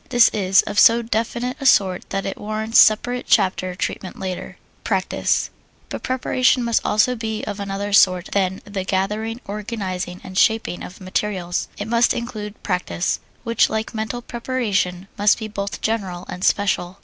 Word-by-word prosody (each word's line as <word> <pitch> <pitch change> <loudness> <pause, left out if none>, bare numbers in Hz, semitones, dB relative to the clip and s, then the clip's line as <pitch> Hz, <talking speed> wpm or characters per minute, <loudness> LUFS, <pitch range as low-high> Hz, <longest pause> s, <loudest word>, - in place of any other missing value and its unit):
This 245 -3 +6
is 195 -2 +3
of 205 - -1
so 235 +1 +6
definite 235 +3 -2
a - - -4
sort 190 -6 +3
that 195 0 -2
it 195 - -4
warrants 215 +2 +1
separate 245 +4 +4
chapter 185 -3 +2
treatment 185 0 -4
later. 185 -2 -5 0.3
Practise - - 0 0.4
But - - -5
preparation 255 0 +1
must 235 -1 +1
also 215 +4 +2
be 220 -2 -4
of 205 -1 -5
another 200 0 -3
sort 185 -2 +4
than 190 -1 0
the 200 -2 -4
gathering, 210 +5 -2
organizing, 195 -4 -4
and 185 - -9
shaping 220 -5 +2
of 185 - -9
materials 185 -2 -2
it 205 - -4
must 235 +1 +3
include 215 -3 -6
practise, 180 -2 -1 0.2
which, 230 -2 +2
like 220 +2 -3
mental 220 +2 -4
preparation, 205 -8 -2
must 205 0 +4
be 220 - -5
both 200 -1 -5
general 195 -6 -2
and 180 +1 -7
special. 190 -2 +1
210 Hz, 160 wpm, -21 LUFS, 190-230 Hz, 0.4 s, This